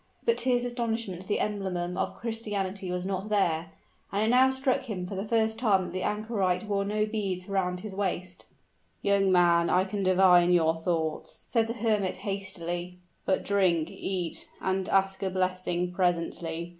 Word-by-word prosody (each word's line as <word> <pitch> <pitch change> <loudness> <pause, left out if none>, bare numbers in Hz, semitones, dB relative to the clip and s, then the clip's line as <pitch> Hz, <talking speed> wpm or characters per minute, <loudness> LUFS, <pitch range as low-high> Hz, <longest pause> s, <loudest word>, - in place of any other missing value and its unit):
But 465 0 +2
to 260 - 0
his 245 -1 +2
astonishment 225 -6 -3
the 210 - 0
emblem 185 -4 -2
of - - -2
Christianity 205 -4 -3
was 180 0 -2
not 195 +2 -3
there; 170 -5 +1 0.4
and 200 +2 +1
it - - +2
now 255 +2 +6
struck 265 -1 0
him 185 -4 -3
for 185 - -6
the 195 +2 -4
first 220 0 +1
time 205 -6 +3
that 175 -1 -7
the 185 - -2
anchorite 210 -4 0
wore 200 -2 0
no 210 +1 0
beads 195 -4 -3
around 180 -2 -1
his 210 -1 -6
waist. 185 -2 -3 0.6
"Young 200 -1 +3
man, 170 -2 +4
I 180 +1 +4
can 200 +1 -3
divine 185 -2 +5
your 165 -2 +4
thoughts," 160 -2 -2
said 225 -2 +1
the 230 - -2
hermit, 215 -4 0
hastily; 180 -3 -4 0.3
"but 190 - +1
drink, 180 -5 +2
eat, 180 -3 -3
and 190 0 -1
ask 195 0 +2
a 195 - 0
blessing 185 -1 -1
presently. 170 -2 -1
190 Hz, 170 wpm, -28 LUFS, 180-210 Hz, 0.6 s, now